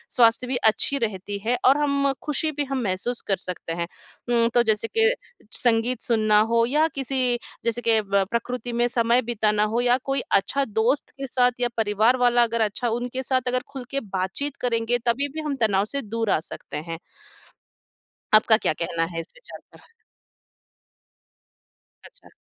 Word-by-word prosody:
स्वास्थ्य 235 +1 +4
भी 260 - -1 0.2
अच्छी 280 +5 0
रहती 205 -4 -3
है 245 +2 +1
और 265 +3 +6
हम 280 -1 +2
खुशी 305 +1 -1
भी 295 -1 -2
हम 270 -1 -2
महसूस 205 +5 -2
कर 195 - +1
सकते 180 -3 -5
हैं। 170 0 -3 0.4
उम, 235 -1 +3
तो 240 - +5
जैसे 220 0 +1
के 450 0 +6 0.5
संगीत 240 0 +1
सुनना 215 -2 +3
हो 230 0 +4
या 300 +6 +2
किसी 270 -1 -2 0.4
जैसे 235 +1 0
के 225 -2 +3
ब 200 -1 +1
प्रकृति 245 0 -3
में 240 +1 +2
समय 235 +1 +2
बिताना 215 -3 +1
हो 235 - +2
या 245 0 +3
कोई 270 -1 -1
अच्छा 275 +8 +1
दोस्त 225 +5 0
के 275 0 -5
साथ 250 -1 +2
या 245 - +2
परिवार 220 +3 +2
वाला 245 -1 +4
अगर 230 0 -1
अच्छा, 220 +3 -1
उनके 245 +3 -3
साथ 260 0 +1
अगर 250 0 +1
खुल 270 -2 -6
के 275 - 0
बातचीत 205 +6 -3
करेंगे, 235 -1 0
तभी 250 +4 +1
भी 315 - -4
हम 290 -2 -1
तनाव 200 -2 +2
से 280 +6 -2
दूर 225 -1 -3
आ - - +3
सकते 160 - -7
हैं। 165 +2 -5 1.4
आपका 220 0 +6
क्या 215 - 0
कहना 165 0 -2
है 165 - -3
इस 165 - -8
विचार - - -12
पर? - - -20 2.1
अच्छा। - - -17
235 Hz, 175 wpm, -24 LUFS, 215-255 Hz, 2.1 s, और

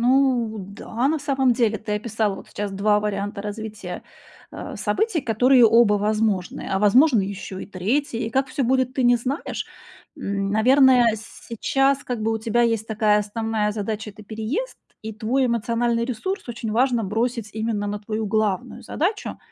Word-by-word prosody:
ну 245 -3 +2
да, 205 +6 -3
на 315 +1 +1
самом 270 -3 +2
деле 225 -3 +1
ты 210 +1 -5
описала 215 -2 -2
сейчас 205 -1 -4
2 210 +1 +2
варианта 205 -1 -3
развития, 210 -3 -6 0.5
э, - - -7
событий, 435 -6 0
которые 245 +1 +4
оба 230 -1 +5
возможны. 210 -2 -1
А 190 - +1
возможно 235 +5 +5
ещё 195 -1 -5
и - - -7
3. 230 +5 -1
И 225 - -4
как 265 +3 +1
всё 270 - -2
будет, 260 +1 +1
ты 260 - 0
не 245 0 +5
знаешь. 265 +6 -4 0.5
М, 200 0 -2
наверное, 250 +1 +5
сейчас 270 +5 -1
как 245 -3 -3
бы 225 - +1
у 225 - -1
тебя 230 +2 +1
есть 225 -2 +1
такая 215 -1 +2
основная 210 0 -1
задача- 215 0 -4
это 210 +2 -14
переезд, 220 - -4 0.3
и 220 0 -5
твой 245 +5 0
эмоциональный 235 0 0
ресурс 265 - -4
очень 230 -2 -4
важно 245 0 +2
бросить 225 +2 -2
именно 220 -1 -2
на 205 0 -3
твою 215 +1 -3
главную 210 -2 -1
задачу. 390 +7 -2
225 Hz, 165 wpm, -23 LUFS, 210-250 Hz, 0.5 s, оба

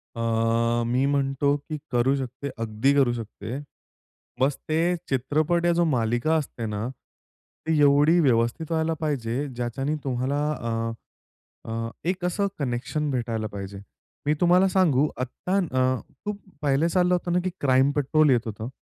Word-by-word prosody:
अ, 115 +1 +1
मी 125 +3 +1
म्हणतो, 140 0 +1
की 155 +2 -6
करू 125 +2 +3
शकते. 135 +1 -5
अगदी 115 +4 +1
करू 135 -4 +3
शकते. 115 +2 -6 0.8
बस 135 +1 +2
ते 165 +3 +2
चित्रपट 155 +6 +1
या 175 - +4
जो 170 0 +2
मालिका 120 +2 +1
असते 125 -6 -4
ना, 105 +1 -3
ती 155 +3 -6
एवढी 145 +4 +5
व्यवस्थित 125 +2 +1
व्हायला 160 0 +1
पाहिजे 140 -3 -1
ज्याच्याने 130 +5 -2
तुम्हाला 130 +1 -1
अ, 115 -4 -2 0.8
अ, 115 0 -3 0.2
एक 185 0 -1
असं 200 +3 +1
कनेक्शन 140 +3 -2
भेटायला 115 -4 -2
पाहिजे. 100 0 -6 0.5
मी 150 - +3
तुम्हाला 180 +2 +5
सांगू 155 -7 +3
आत्ता 180 +8 -2
अ, 130 -7 +1 0.2
खूप 205 -1 -4 0.2
पहिलं 145 +3 +2
चाललं 180 0 +3
होतं 175 0 -1
ना, 180 - +3
की 185 - 0
क्राईम 135 0 +4
पेट्रोल 150 +1 +3
येत 120 -3 +2
होतं. 110 +1 -5
135 Hz, 145 wpm, -25 LUFS, 120-155 Hz, 0.8 s, एवढी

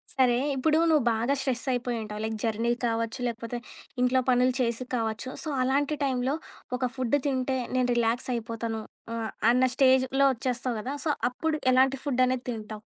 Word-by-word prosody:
సరే. 255 -3 +4 0.2
ఇప్పుడు 305 +4 +2
నువ్వు 305 -4 +4
బాగా 230 +5 +1
స్ట్రెస్సయిపోయి 250 -2 -1
ఉంటావు. 210 -1 -6
లైక్ 220 0 -2
జర్నీ 230 +1 0
కావచ్చు, 230 +1 -1
లేకపోతే 235 0 -4 0.4
ఇంట్లో 250 +1 +3
పనులు 250 0 +4
చేసి 235 0 0
కావచ్చు. 225 +1 -2
సో, 315 - -4
అలాంటి 280 +3 +1
టైం‌లో 260 +1 0 0.4
ఒక 255 -1 -1
ఫుడ్ 255 +2 +2
తింటే 260 -1 0 0.2
నేను 255 -1 +2
రిలాక్స్ 235 +2 0
అయిపోతాను. 230 -1 -3 0.3
ఆహ్, 225 -1 -3 0.2
అన్న 250 +1 +3
స్టేజ్‌లో 265 +1 +4
ఒచ్చేస్తావు 245 0 -2
గదా! 265 +6 -4
సో, 310 - +3 0.2
అప్పుడు 310 +5 -1
ఎలాంటి 265 +1 +4
ఫుడ్ 255 -3 +2
అనేది 255 0 -1
తింటావు? 215 -2 -7
250 Hz, 160 wpm, -27 LUFS, 230-265 Hz, 0.4 s, సరే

